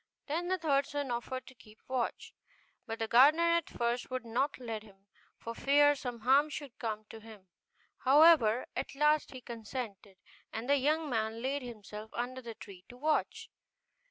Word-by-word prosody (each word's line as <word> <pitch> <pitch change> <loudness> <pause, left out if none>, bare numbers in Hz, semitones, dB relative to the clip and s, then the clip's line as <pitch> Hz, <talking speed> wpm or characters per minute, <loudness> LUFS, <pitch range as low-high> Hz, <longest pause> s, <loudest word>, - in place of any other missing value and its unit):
Then 330 +4 -2
the 375 +1 +1
third 285 -5 +1
son 285 -3 -3
offered 250 +2 -4
to - - -13
keep 215 -3 -18
watch; 255 -2 -3 0.5
but 225 0 -4
the 225 - -2
gardener 285 +9 +6
at 335 -2 +1
first 240 +1 -2
would 255 -2 -4
not 255 +5 -1
let 230 -4 -5
him, 195 -2 -19 0.3
for 230 - -6
fear 290 +4 +4
some 245 -4 -6
harm 275 +5 +4
should 285 -4 -8
come 215 -2 -3
to 225 - -9
him: 215 -4 -14 0.5
however, 270 -5 +6
at - - -4
last 300 +1 +3
he 260 -2 -9
consented, 220 -4 -7 0.3
and 225 +2 -5
the 285 +1 +4
young 305 +4 +1
man 225 -2 -2
laid 275 +2 -1
himself 215 -3 -9
under 255 +2 -3
the 230 -2 -8
tree 195 -4 -12
to 245 - -12
watch. 305 +4 -1
250 Hz, 175 wpm, -32 LUFS, 225-285 Hz, 0.5 s, gardener